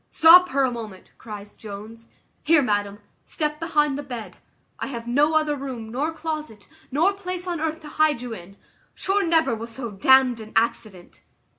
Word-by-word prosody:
"Stop 360 +3 +7
her 275 0 +1
a 260 - +1
moment," 215 -6 -9
cries 205 -2 -9
Jones 220 +2 -10 0.3
"Here, 315 -2 +4
madam, 205 -3 -1 0.3
step 300 -1 -3
behind 300 -4 +1
the - - -3
bed, 245 -6 -8 0.4
I - - -3
have 235 -4 -6
no 290 +6 +2
other 305 -1 +2
room 260 -5 -6
nor 285 +7 -1
closet, 310 -9 -6 0.2
nor 330 +9 +2
place 365 -2 -5
on 345 -3 -3
earth 320 0 -2
to 305 - -11
hide 305 -4 +3
you 245 -1 -6
in; 195 0 -11 0.4
sure 395 +1 0
never 325 -6 +2
was 230 +1 -5
so 235 -1 -6
damned 250 +4 +4
an 220 0 -11
accident." 215 -5 -2
265 Hz, 175 wpm, -23 LUFS, 225-315 Hz, 0.4 s, Stop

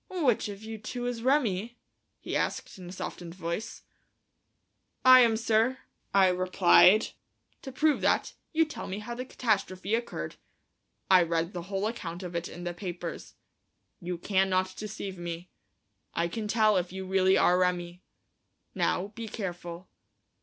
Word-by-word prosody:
"Which 280 - +1
of 200 +1 -8
you 220 0 -7
two 245 +3 -5
is 245 -2 -3
Remi?" 240 -4 +1 0.4
he - - -5
asked, - - -2
in 180 -1 -9
a - - -8
softened 175 -2 -7
voice. 185 +6 -5 1.2
"I 255 0 +10
am, 230 -3 +5
sir," 225 +3 +2 0.3
I 195 -1 +5
replied. 185 +3 +5 0.5
"To 265 - -7
prove 300 +3 +2
that, - - +1 0.2
you 325 0 +3
tell 305 - -7
me 190 - -4
how 215 +3 -6
the 250 +2 -5
catastrophe 210 -5 -1
occurred. 235 +1 -3 0.7
I 185 -1 +8
read 170 +1 0
the 175 - -4
whole 195 0 -1
account 185 -6 -4
of 175 -1 -6
it 170 0 -3
in 175 - -9
the 175 0 -3
papers. 175 -2 -6 0.6
You 175 0 -4
cannot 185 0 +1
deceive 200 -3 -6
me. 170 +1 -6 0.6
I 170 +1 +1
can 210 +5 -4
tell 215 -1 +3
if 180 -1 -1
you 190 0 -6
really 190 0 +3
are 180 +1 +4
Remi. 180 -1 -1 0.7
Now, 190 +3 0
be 225 +1 -7
careful." 175 -4 -6
190 Hz, 155 wpm, -29 LUFS, 180-225 Hz, 1.2 s, I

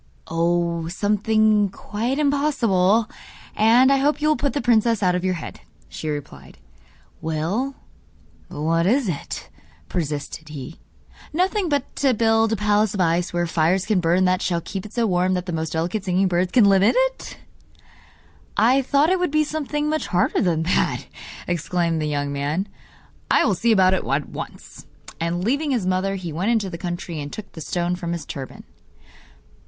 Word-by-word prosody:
'Oh, 170 0 0
something 210 +2 +2
quite 225 +7 -3
impossible; 235 -9 +2 0.5
and 240 +5 +5
I 275 - +4
hope 290 +2 +1
you 305 0 +1
will 305 - +4
put 285 -2 -1
the 290 - -1
princess 230 -3 +2
out 180 -1 +3
of 180 0 -1
your 185 -1 0
head,' 160 - -8 0.3
she 155 - -5
replied. 135 - -7 0.6
'Well, 175 - -2 0.7
but 145 - -7
what 165 +2 +2
is 250 +3 +2
it?' 165 -6 -5 0.4
persisted 150 -1 -4
he. 145 +1 -8 0.5
'Nothing 370 +2 +1
but 285 -2 -2
to 270 -3 +2
build 225 0 +3
a - - +2
palace 210 0 +1
of - - -4
ice 175 0 +1
wherein 175 0 0
fires 170 +3 +1
can 210 -3 +2
burn 175 +2 +2
that 185 0 +2
shall 175 -2 0
keep 195 +4 -6
it 210 - -18
so 235 -1 +1
warm 185 -1 +1
that 180 0 -3
the 175 - -4
most 160 -1 -3
delicate 175 +6 -2
singing 190 0 +1
birds 180 0 0
can 235 -1 +5
live 195 -1 +5
in 200 - +4
it!' - - -1 1.2
'I 245 +6 +4
thought 285 +5 +2
it 375 - +2
would 360 - +1
be 305 +1 +2
something 300 -1 -2
much 310 0 -1
harder 180 -1 +1
than 165 -3 +1
that,' 175 - 0 0.4
exclaimed 170 -1 -1
the 155 - -1
young 145 -1 -2
man. 145 +8 -2 0.6
'I - - +4
will 210 - +2
see 230 +6 +1
about 190 -3 +5
it 190 - 0
at 140 +2 -1
once.' - - -9 0.3
And 170 +2 -1
leaving 285 +8 0
his 240 -8 0
mother, 185 +1 0
he 175 -4 -5
went 180 +7 -1
into 215 -5 +1
the 170 - -7
country 175 -3 -4
and 145 0 -6
took 215 - -8
the 160 - -9
stone 175 +3 -1
from 170 -1 -4
his 170 - -5
turban. 135 -2 -8
185 Hz, 180 wpm, -22 LUFS, 170-230 Hz, 1.2 s, and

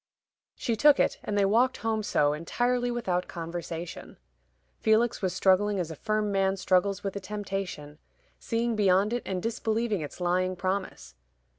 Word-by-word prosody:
She 235 - -1
took 290 +4 +5
it, - - +1
and 205 - -2
they 200 - +4
walked 235 +6 +3
home 220 -1 +1
so, 145 -8 +2
entirely 245 +10 0
without 190 -7 -1
conversation. 170 0 -6 0.6
Felix 220 +2 +2
was 185 -2 0
struggling 190 +2 +2
as 170 -2 -3
a - - -6
firm 215 +4 -1
man 195 0 +1
struggles 190 +1 +1
with 195 -1 -3
a - - -2
temptation, 190 -7 -5 0.4
seeing 230 0 -1
beyond 200 +1 +3
it 240 - -1
and 185 -2 -3
disbelieving 225 -3 -1
its 150 - -7
lying 185 +1 +1
promise. 190 +1 -3
195 Hz, 155 wpm, -28 LUFS, 180-220 Hz, 0.6 s, took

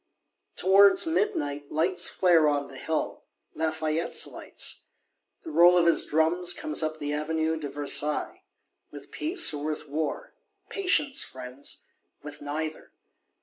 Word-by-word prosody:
Towards 195 +1 +5
midnight 235 - -2
lights 175 +3 +2
flare 170 -4 +3
on 145 -1 -1
the 135 - -11
hill; 160 -1 -4 0.3
Lafayette's 160 +1 0
lights! - - -6 0.6
The 325 - -8
roll 175 - +6
of 170 - +3
his 170 - +3
drums 170 +3 +2
comes 310 - -2
up 155 0 -3
the 145 -1 -4
Avenue 160 +1 -1
de 145 -2 -5
Versailles. 145 +1 -1 0.5
With - - -13
peace, 325 - +3
or 145 0 -5
with 155 -1 -4
war? 155 - -4 0.4
Patience, 300 -8 +2
friends! 130 +2 -8 0.4
With 150 0 -10
neither. 155 +2 -5
160 Hz, 130 wpm, -26 LUFS, 150-180 Hz, 0.6 s, roll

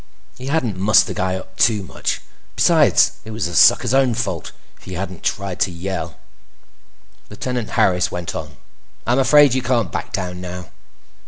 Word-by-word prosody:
He 130 - -9
hadn't 125 -10 -1
mussed 105 +2 +5
the - - -5
guy 95 -2 -1
up 95 0 -10
much; 105 -5 -3 0.3
besides, - - +4
it - - -11
was 110 -1 -3
the 85 - -4
sucker's 100 - +5
own 135 -3 +3
fault. 95 - -3 0.3
If - - -19
he 95 - -7
hadn't 95 -1 -5
tried 100 -3 -3
to 95 - +1
yell— 85 -1 -5 1.1
Lieutenant 120 +2 -4
Harris 90 -1 +3
went 90 -1 -5
on: - - -7 0.5
"I'm 120 +3 +2
afraid 145 0 +5
you 130 - 0
can't 120 -7 0
back - - -5
down 90 -1 -4
now." 90 -1 -7
95 Hz, 165 wpm, -20 LUFS, 90-120 Hz, 1.1 s, mussed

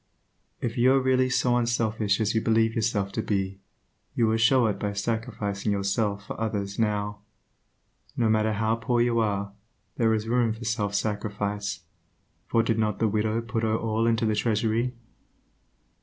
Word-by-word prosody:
If 120 +1 -2
you 130 +2 +5
are 135 - +4
really 130 0 +2
so 125 -1 +2
unselfish 110 -3 0
as 110 -2 +1
you 110 - +1
believe 115 0 +2
yourself 105 -3 0
to 110 - -2
be, 95 -2 -2 0.6
you 115 - +3
will 110 0 +2
show 125 +2 +4
it 105 -3 -1
by 105 -1 -2
sacrificing 105 -1 -2
yourself 100 +1 -1
for - - -7
others 100 -2 -2
now. 105 -2 -1 1.0
No 115 - +2
matter 110 0 +2
how 110 +2 0
poor 120 +1 0
you 120 -1 +2
are, 100 -2 -1 0.4
there 115 -2 +3
is 110 0 -3
room 120 -1 +2
for 115 +2 -9
self 105 -2 -1
sacrifice, 100 -2 -2 0.7
for 115 - +2
did 115 -1 0
not 105 -2 0
the 110 - +2
widow 110 +2 0
put 115 0 -3
her 110 0 +1
all 115 0 0
into 115 0 +2
the 110 - +2
treasury? 115 +3 0
110 Hz, 170 wpm, -26 LUFS, 105-115 Hz, 1.0 s, you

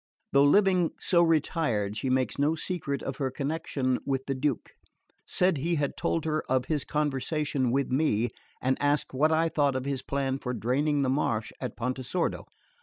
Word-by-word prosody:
Though 140 +1 +6
living 185 +2 +4
so 175 -3 +3
retired 150 - +1
she 130 +4 -2
makes 130 +1 0
no 150 +3 +2
secret 155 -4 -2
of 135 - -4
her 135 -2 -1
connection 140 -2 -2
with 135 -1 -2
the 135 - -1
Duke; 135 -1 -2 0.6
said 180 -3 +2
he 165 +5 0
had 145 -2 -1
told 165 - -1
her 155 0 0
of 130 -1 +2
his 150 -4 -1
conversation 145 -2 -1
with 135 +2 0
me, 125 -5 +2 0.3
and 130 +1 +1
asked 145 -1 +1
what 150 +4 +3
I 160 +1 +3
thought 145 -4 +1
of 130 0 -2
his 140 -2 -2
plan 135 0 -2
for 125 -2 -3
draining 140 +6 +1
the 130 - +1
marsh 115 -6 0
of 125 - -4
Pontesordo. 130 +7 -2
140 Hz, 180 wpm, -28 LUFS, 130-155 Hz, 0.6 s, Though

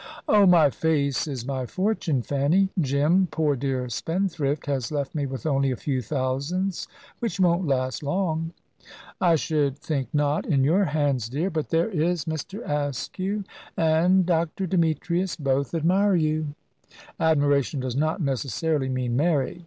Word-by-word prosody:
"Oh, 205 -2 +5
my 165 -5 +6
face 145 -2 0
is 130 -5 -5
my 130 -2 -3
fortune, 185 - -1
Fanny. 145 +9 +2
Jim, 150 +6 +2
poor 150 -3 +1
dear 130 -1 -2
spendthrift, 160 - -2
has 135 -3 -2
left 140 -2 -2
me 145 -3 -1
with 130 -4 -6
only 135 -3 +2
a 130 - -1
few 130 +1 -2
thousands, 145 - -2 0.3
which 230 -4 -3
won't 175 -1 +2
last 130 -2 -1
long." 165 +1 -1 0.7
"I 175 -3 +5
should 150 -3 0
think 140 -3 -3
not, 145 0 +1
in 140 -4 +2
your 180 +8 +3
hands, 145 -7 0
dear. 160 +9 -1
But 155 -3 -3
there 165 +1 +2
is 170 -2 0
Mr. 160 +7 -5
Askew 150 - -2 0.3
and 170 +4 +3
Dr. 170 +2 0
Demetrius 170 +1 0
both 140 +1 -1
admire 185 +5 +3
you." 155 -2 0 0.6
"Admiration 145 -3 +2
does 130 -2 -3
not 155 +6 0
necessarily 135 +2 -1
mean 125 -2 -1
marriage. 150 +2 +1
155 Hz, 145 wpm, -25 LUFS, 140-170 Hz, 0.7 s, my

